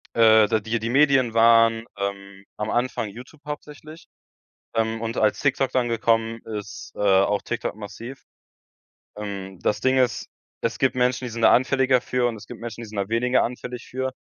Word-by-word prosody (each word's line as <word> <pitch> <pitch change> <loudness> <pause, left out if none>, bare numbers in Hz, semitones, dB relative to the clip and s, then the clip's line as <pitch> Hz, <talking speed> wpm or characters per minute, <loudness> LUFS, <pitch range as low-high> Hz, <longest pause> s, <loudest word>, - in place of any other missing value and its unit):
Äh, 110 -2 +6
d 110 - +1
die 115 +2 -2
die 115 +1 -3
Medien 135 -3 +3
waren, 115 0 +5
ähm, 100 0 -5
am 105 +1 -3
Anfang 120 -3 -1
YouTube 125 +8 -13
hauptsächlich. 150 +2 -9 0.7
Ähm, 115 0 0
und 115 +1 -4
als 105 -1 +2
TikTok 135 -2 +1
dann 125 -2 +1
gekommen 115 0 +1
ist, 105 -2 -7
äh, - - -11
auch 100 0 +3
TikTok 120 - -4
massiv. 115 +5 -9 0.9
Ähm, 100 -3 -6
das - - 0
Ding 130 0 +2
ist, 125 -2 +1 0.4
es 115 -3 -1
gibt 130 -1 +1
Menschen, 125 0 +1
die - - -6
sind 115 0 -5
da - - +7
anfälliger 130 0 +3
für 125 0 0
und 120 - -1
es 105 - -12
gibt - - -10
Menschen, 115 -1 -7
die 115 - -8
sind 105 - -10
da 100 - -1
weniger 125 +3 +2
anfällig 125 0 -6
für. 130 +1 -3
115 Hz, 185 wpm, -24 LUFS, 110-125 Hz, 0.9 s, da